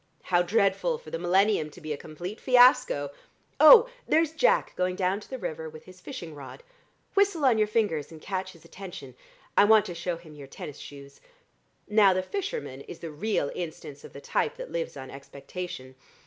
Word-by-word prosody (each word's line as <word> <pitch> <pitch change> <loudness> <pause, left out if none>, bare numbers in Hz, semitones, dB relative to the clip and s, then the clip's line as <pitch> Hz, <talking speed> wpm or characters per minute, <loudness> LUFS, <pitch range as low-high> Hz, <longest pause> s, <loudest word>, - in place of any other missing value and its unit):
How 175 -1 +2
dreadful 200 - +1
for 480 - -13
the - - -3
millennium 180 -2 +2
to 165 - -14
be 155 -2 -4
a - - -3
complete 175 +8 -8
fiasco! 245 - +4 0.5
Oh, 480 0 +9 0.2
there's 320 -1 +3
Jack 300 -6 +2
going 180 0 -1
down 185 +1 0
to - - -15
the 260 - -5
river 160 -8 -5
with 155 0 -13
his 185 0 -15
fishing 180 - -8
rod. 145 - -11 0.5
Whistle 395 -7 +2
on 235 -4 +4
your 215 - +3
fingers 205 -10 -1
and 160 - -11
catch 185 +1 -4
his 165 - -19
attention. 175 -9 -10 0.4
I - - +6
want 215 -1 +5
to 175 - -6
show 170 0 -3
him 165 -2 -14
your 145 -2 -11
tennis 140 +1 -9
shoes. 140 -1 -12 0.7
Now, 210 -2 +5
the 185 - 0
fisherman 400 - -5
is 420 -3 -10
the 165 - -8
real 150 -1 -1
instance 155 -4 -7
of - - -11
the 140 - -10
type - - -1
that - - -8
lives - - -4
on 130 - -8
expectation. 140 0 -8
185 Hz, 190 wpm, -27 LUFS, 155-230 Hz, 0.7 s, Oh